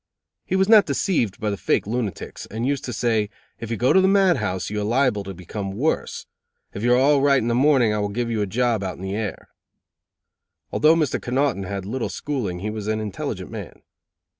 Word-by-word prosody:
He - - 0
was 190 0 +3
not 215 -2 +7
deceived 120 - 0
by 105 -1 -1
the 100 - -3
fake - - 0
lunatics, 110 -3 -4
and 115 +3 -4
used 140 0 -1
to 125 - -4
say: 110 -2 0 0.3
"If 115 - -6
you 115 - -2
go 125 +4 +3
to 190 - +6
the 190 - +4
mad 195 -4 +4
house, 95 -4 -3
you 105 0 -2
are - - -1
liable 115 -1 +1
to 95 -1 -7
become 95 +2 -6
worse. 140 +10 -1 0.5
If 100 - -6
you 120 +2 +4
are - - +3
all 140 +2 +4
right 140 0 +4
in 120 -2 0
the - - +1
morning 130 -3 +4
I 105 - -1
will 105 0 -1
give 115 +3 -2
you 110 -2 0
a 100 - 0
job 115 +1 +1
out 95 - -3
in 95 - -10
the 95 +1 -3
air." 105 -2 -4 1.2
Although 155 +2 +4
Mr. 155 -4 0
Connoughton 125 -5 0
had 90 - -7
had 100 -2 -4
little 120 +4 -3
schooling 105 -12 -3
he 105 +2 -3
was 105 -1 -5
an 110 0 0
intelligent 105 -3 -5
man. - - -8
115 Hz, 230 wpm, -23 LUFS, 105-135 Hz, 1.2 s, not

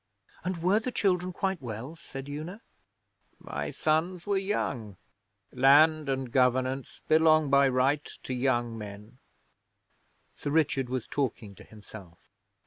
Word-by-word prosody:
'And 175 -2 -3
were 195 +4 +4
the 250 +3 -4
children 185 -5 +1
quite 190 -1 -2
well?' 120 +5 -6
said 135 -4 -9
Una. 155 +9 -7 0.7
'My - - -5
sons 165 +3 0
were 205 - 0
young. 130 - -2 0.6
Land 150 +3 +5
and 135 -2 -2
governance 130 +1 +1
belong 155 -2 +4
by 140 -1 +5
right 135 +3 +2 0.2
to 130 - -4
young 120 -2 0
men.' 105 +3 -10 1.2
Sir - - -5
Richard 140 -4 +1
was 130 -2 -2
talking 120 -7 -3
to - - -14
himself. 100 -5 -13
140 Hz, 130 wpm, -28 LUFS, 125-165 Hz, 1.2 s, Land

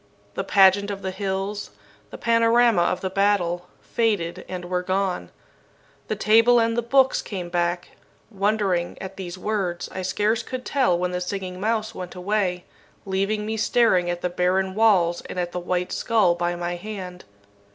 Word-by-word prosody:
The - - -3
pageant 200 +1 +4
of 200 -1 -5
the 190 - -2
hills, 195 +1 -3 0.4
the - - -9
panorama 230 -3 +3
of 175 +1 0
the 190 - -2
battle, 185 -3 +1 0.2
faded 185 -6 -1
and 180 -1 -5
were 180 0 -1
gone. 185 - -1 0.8
The - - -1
table 230 +3 +5
and 230 0 +1
the 240 - +1
books 265 +3 +3
came 180 -4 -6
back. 175 0 -1 0.4
Wondering 195 -4 0
at 190 0 -7
these 185 -2 -7
words, 185 -3 -2
I 185 - -4
scarce 210 +5 0
could 255 +1 -6
tell 260 -11 +2
when 180 +1 -1
the 180 0 -3
Singing 185 0 -4
Mouse 220 +1 -1
went 180 -3 -7
away, 180 -1 -1 0.4
leaving 200 +2 -1
me 220 +1 -3
staring 210 -5 +3
at 175 0 -3
the 180 - -1
barren 185 +2 +1
walls 185 -6 +3
and 185 - -4
at 175 -1 -2
the 180 - -3
white 180 0 -2
skull 215 -7 +2
by 175 0 -1
my 175 0 -3
hand. 185 -2 -8
190 Hz, 170 wpm, -24 LUFS, 180-215 Hz, 0.8 s, table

